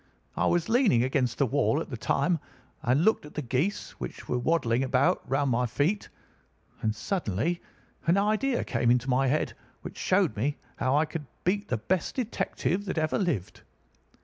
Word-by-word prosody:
I - - +1
was 175 -1 +2
leaning 225 - +4
against 130 -2 0
the 140 - +3
wall 140 +3 +2
at 165 - -6
the - - -2
time 155 +8 +1 0.4
and 130 +7 +2
looking 220 -8 +2
at - - -16
the 150 - -2
geese 135 +11 -1
which 60 - -7
were 125 - 0
waddling 125 -3 +1
about 130 +1 +2
round 135 0 +1
my 125 +1 +2
feet, 150 - 0 0.7
and 110 -1 0
suddenly 170 - -1 0.5
an 170 +4 +4
idea 215 +6 +1
came 120 - 0
into 125 +2 +2
my 135 +2 +3
head 150 +4 +1 0.3
which - - -8
showed - - +2
me 140 +7 -1 0.2
how 130 +3 +2
I 155 - +3
could 150 -2 -6 0.2
beat 200 +3 0
the - - 0
best 185 -2 -1
detective 205 -5 -1
that 185 - -3
ever 155 -1 +1
lived. 140 - -2
145 Hz, 175 wpm, -28 LUFS, 125-180 Hz, 0.7 s, leaning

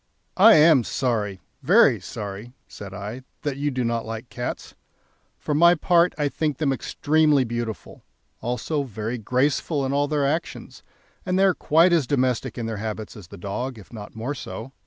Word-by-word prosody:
"I 220 +4 +8
am 150 -4 +6
sorry, 105 -7 -2 0.2
very - - +5
sorry," 105 +4 -7
said 100 -1 -10
I, 105 +5 -7 0.2
"that 145 -3 -2
you 145 +1 -1
do 130 -2 -2
not 115 -1 -1
like 115 +2 -7
cats. 120 - -5 0.6
For 150 - -3
my 170 +4 +6
part, 170 +1 +3
I 145 -1 +1
think 150 -1 -2
them 145 -4 +1
extremely 150 +1 +2
beautiful, 120 -2 -5 0.4
also 125 +5 -2
very 115 -1 -4
graceful 135 +5 0
in 135 - -2
all 145 +1 +1
their 145 -1 0
actions, 155 +5 -3 0.4
and 185 0 -1
they 190 - +4
are 195 -1 +5
quite 165 +3 +3
as 160 -7 +2
domestic 130 -3 0
in 120 - -3
their 110 -1 -4
habits 110 0 -5
as 100 -6 -11
the 100 - -11
dog, 115 +7 -4
if 105 +2 -14
not 105 -2 -9
more 115 +6 -3
so. 120 -1 -8
130 Hz, 180 wpm, -24 LUFS, 110-150 Hz, 0.6 s, I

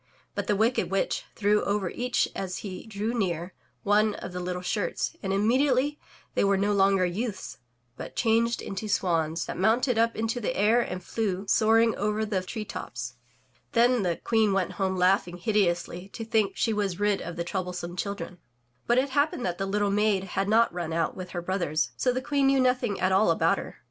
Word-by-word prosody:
But - - -3
the 210 - +2
wicked 225 +5 +1
witch 195 0 -1
threw 210 0 +2
over 200 -3 -1
each 245 0 0
as 185 -2 -4
he 185 +2 -7
drew 215 +2 -3
near, 180 -5 -2 0.3
one 210 +1 +3
of 180 - -7
the 180 - -4
little 180 0 -4
shirts, 485 - -2
and 195 - -2
immediately 255 +7 +2 0.3
they - - +1
were 200 0 +3
no 205 +2 +1
longer 195 -1 +3
youths, 205 +5 -4 0.4
but - - -8
changed 230 0 +2
into 195 +2 -5
swans, 165 -4 0
that - - -6
mounted 225 +4 +2
up 230 0 +2
into 225 +2 -1
the 245 +3 -2
air 220 +4 +4
and 185 -5 -5
flew, 200 -4 -2
soaring 225 +2 +4
over 210 +1 0
the 200 -3 -1
tree 215 +4 -5
tops. 120 - -6 0.6
Then 240 0 +4
the 175 -3 0
Queen 220 -3 +2
went 195 -1 0
home 190 -1 +1
laughing 180 -1 +2
hideously 180 -2 0
to 225 - -5
think 220 -3 +1
she 225 - +1
was 200 -3 -1
rid 205 -1 +1
of 170 - -6
the 170 - -2
troublesome 180 -1 -4
children. 200 -2 -5 0.5
But 240 - +3
it 265 +1 +2
happened 285 -2 +1
that 175 -1 -2
the 195 - -1
little 205 0 +1
maid 205 -1 +2
had 195 +1 0
not 230 0 +4
mn 170 -2 -3
out 165 0 0
with 185 -1 -7
her 175 -1 -5
brothers, 170 -4 -1
so 250 - +1
the 255 +1 -3
Queen 280 -1 +2
knew 270 0 +4
nothing 250 -5 +1
at 185 +1 +1
all 195 +3 +4
about - - +2
her. - - -9
205 Hz, 200 wpm, -27 LUFS, 185-225 Hz, 0.6 s, air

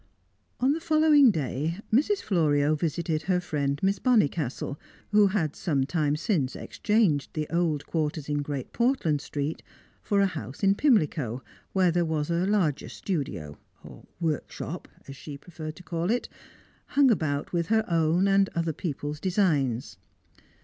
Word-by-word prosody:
On 260 +2 +3
the 310 - 0
following 310 -4 +5
day, 155 - -1 0.2
Mrs. 345 - +2
Florio 150 -6 +2
visited 160 0 -1
her 180 +3 +1
friend 145 -5 -2
Miss 195 +1 +2
Bonnicastle, 150 - +1 0.3
who 210 -1 +6
had 180 -7 -1
some 140 -6 0
time 150 -1 0
since 150 - -1
exchanged 205 -10 +1
the 155 -1 -2
old 165 -4 0
quarters 155 -2 -2
in 145 -1 0
Great 140 -3 -5
Portland 235 - +1
Street 145 +2 -4 0.4
for 205 - +1
a 200 - +5
house 160 -4 -6
in 195 0 +5
Pimlico, 155 - +1 0.3
where 185 -2 +3
there 175 +1 +1
was 160 -1 -1
a 170 +2 +1
larger 185 -9 +1
studio 100 - -4 0.6
(workshop, 160 -4 -3 0.2
as 135 - -8
she 145 +1 -8
preferred 155 0 -8
to 180 - -13
call 170 +1 -2
it), 245 +2 0 0.7
hung 275 -3 +6
about 150 -8 -1
with 170 -1 0
her 220 0 +2
own 165 +3 +2
and 195 0 +3
other 165 -1 0
people's 150 -2 -4
designs. 150 - 0
165 Hz, 150 wpm, -27 LUFS, 145-195 Hz, 0.7 s, who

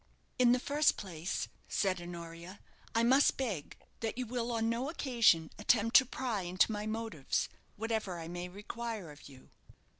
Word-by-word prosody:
"In 245 -1 +6
the 250 - +5
first 290 +3 +2
place," 180 -2 -3 0.2
said 185 -3 0
Honoria, 170 +2 -8 0.4
"I 230 - +4
must 265 +4 +5
beg 210 - -3 0.2
that 225 +1 -3
you 255 - -2
will 240 0 -2
on 225 -1 0
no 235 +4 -1
occasion 235 - +3
attempt 225 +2 +2
to 260 - +5
pry 240 -6 -2
into 180 +4 +2
my 210 0 -3
motives, 220 -10 -1 0.3
whatever 220 -4 -2
I 165 - -6
may 175 +1 -5
require 210 -1 -6
of 145 0 -13
you." 130 -2 -16
215 Hz, 160 wpm, -33 LUFS, 175-235 Hz, 0.4 s, In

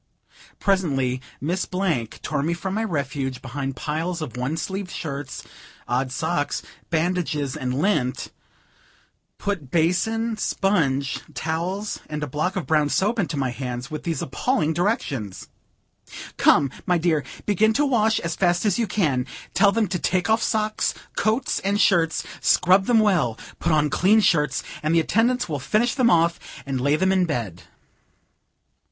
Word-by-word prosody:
Presently, 135 -10 +1 0.2
Miss 175 +6 -1
Blank 170 - -2
tore 150 -3 -1
me 165 +4 0
from 185 +3 -4
my 220 +2 0
refuge 140 - -2
behind 135 +1 -4
piles 165 +5 -2
of 150 -8 -6
one 130 +6 -2
sleeved 190 +3 -4
shirts, 145 -5 -5 0.4
odd 125 +2 0
socks, 160 +1 -1 0.3
bandages 160 -4 0
and 125 0 -2
lint; 150 -9 0 1.1
put 190 -10 -3
basin, 220 - +1
sponge, 140 -12 0 0.2
towels, 180 +6 -2
and 150 0 -3
a - - -2
block 155 +8 -1
of 185 - -2
brown 150 -2 +2
soap 215 +8 +1
into 170 -5 -1
my 130 -2 0
hands, 125 +1 -5
with 155 - -4
these 165 -2 -2
appalling 160 - 0
directions: 145 - -2 0.9
"Come, 140 -2 +4 0.2
my 180 - +3
dear, 160 -3 +1 0.2
begin 210 +2 +3
to 295 +5 +2
wash 225 -5 +2
as 170 -1 -2
fast 175 +1 +1
as 205 +1 +2
you 230 - +1
can. 140 -12 0 0.3
Tell 200 -2 +5
them 225 0 +1
to 180 -1 -1
take 185 +5 +1
off 225 - +3
socks, 215 -1 0 0.2
coats 220 +5 +1
and 200 +1 0
shirts, 165 -6 +3 0.2
scrub 190 +2 +4
them 230 -2 +5
well, 175 - +2 0.2
put 170 - 0
on 150 -2 +2
clean 205 +9 +4
shirts, 155 -8 +2 0.2
and 155 +2 +1
the - - +6
attendants 235 +9 +1
will 150 -4 -3
finish 215 - +1
them 255 -3 +3
off, 170 -3 +3 0.3
and 135 -2 -2
lay 145 +3 +3
them 190 +4 +2
in 190 -1 +3
bed." 100 - -4
165 Hz, 155 wpm, -23 LUFS, 140-200 Hz, 1.1 s, the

